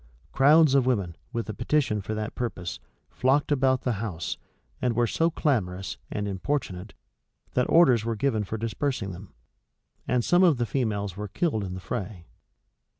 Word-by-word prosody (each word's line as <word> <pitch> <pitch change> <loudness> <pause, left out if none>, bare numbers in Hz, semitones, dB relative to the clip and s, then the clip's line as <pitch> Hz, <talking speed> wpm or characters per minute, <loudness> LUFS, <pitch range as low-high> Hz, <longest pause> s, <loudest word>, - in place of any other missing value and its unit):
Crowds 150 +1 +6
of 135 -2 +4
women, 100 -9 0 0.2
with 115 -1 -3
a 110 - -4
petition 120 -2 0
for 110 +3 -4
that 110 0 -4
purpose, 90 -8 -4 0.3
flocked 135 +4 +1
about 130 -2 +3
the 125 - 0
house, 90 -8 -4 0.4
and 125 -2 +1
were 120 +1 +3
so 165 +8 +1
clamorous 95 - -1
and, 105 -1 -3
importunate, 100 -2 -3 0.6
that 125 - +1
orders 130 -10 +5
were 115 0 -1
given 110 -2 0
for 110 +2 -4
dispersing 115 -1 -2
them; 90 +1 -10 0.8
and 125 -2 +1
some 175 +1 +4
of 170 -7 +5
the 120 - 0
females 105 -7 -2
were 105 +1 -5
killed 125 - -1
in 90 -1 -5
the - - -6
fray. 90 -1 -5
115 Hz, 165 wpm, -26 LUFS, 100-135 Hz, 0.8 s, Crowds